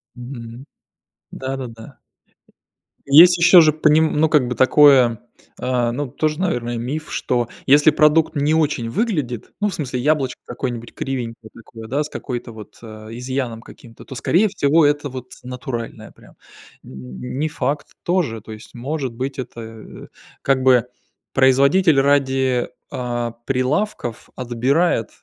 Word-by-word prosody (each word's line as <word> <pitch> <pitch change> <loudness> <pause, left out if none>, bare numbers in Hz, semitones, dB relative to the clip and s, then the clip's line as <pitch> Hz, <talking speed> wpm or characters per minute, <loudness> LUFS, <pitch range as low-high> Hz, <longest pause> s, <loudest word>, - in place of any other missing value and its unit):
Мгм. 120 0 -9 0.7
Да-да-да. 130 -4 -7 1.1
Есть 170 +6 +8
еще 175 +2 +7
же 155 -1 +4
поним 155 +1 +3
ну, 160 0 +3
как 150 -5 +3
бы, 125 - -3
такое, 130 -4 +5 0.4
а, 125 -2 0
ну, 145 +4 -3
тоже, 155 +4 -2
наверное, 120 -10 -2
миф, 145 +7 -5
что 120 -2 -1 0.2
если 145 +3 +6
продукт 150 +1 +3
не 145 +1 +1
очень 150 -7 0
выглядит, 150 - -2
ну, 210 - +1
в 200 - -3
смысле, 130 -4 -4
яблочко 140 -2 0
какое-нибудь 120 -1 -5
кривенькое 115 -4 -5
такое, 115 -1 -12
да, 140 +5 -1
с 150 - -8
какой-то 120 -5 -6
вот 110 -1 -12
э, 110 -1 -11
изъяном 125 -1 -4
каким-то, 115 -1 -15
то, 130 - -9
скорее 175 - +2
всего, 155 -4 +2
это 145 0 0
вот 125 -1 -9
натуральное 125 -2 -6
прям. - - -20 0.5
М, 65 -1 -10 0.2
не 155 +1 0
факт 150 -1 -3 0.2
тоже, 170 -11 0
то 110 +1 -10
есть 110 +1 -13
может 135 +1 -4
быть 130 +4 -5
это, 125 -2 -7
э, 110 -1 -11 0.3
как 135 -1 +1
бы 125 -2 +4 0.5
производитель 140 +4 +4
ради, 135 -3 +1 0.2
а, 120 -1 -3
прилавков 130 - -2
отбирает, 125 +2 0
130 Hz, 140 wpm, -20 LUFS, 120-150 Hz, 1.1 s, Есть